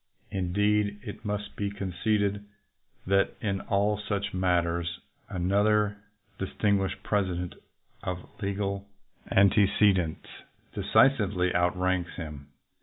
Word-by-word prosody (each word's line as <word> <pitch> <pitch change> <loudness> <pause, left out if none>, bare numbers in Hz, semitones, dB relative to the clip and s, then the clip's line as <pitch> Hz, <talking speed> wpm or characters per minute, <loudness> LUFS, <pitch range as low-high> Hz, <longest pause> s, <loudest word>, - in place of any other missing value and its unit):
Indeed, 105 +2 +1
it 105 - -8
must 105 -1 -4
be 100 -1 -1
conceded 100 +1 -1 0.6
that 100 +1 +2
in 100 -2 -1
all 105 +1 +1
such 100 -1 -2
matters 85 -2 0 0.3
another 100 +3 +2 0.4
distinguished 95 0 0
President 90 -4 -1 0.5
of 90 0 -4
legal 100 0 -2 0.4
antece 100 +1 +5
dents 85 -4 -2 0.5
decisively 100 -9 +3
outranks 90 0 +1
him. 75 -5 -7
100 Hz, 95 wpm, -28 LUFS, 90-105 Hz, 0.6 s, antece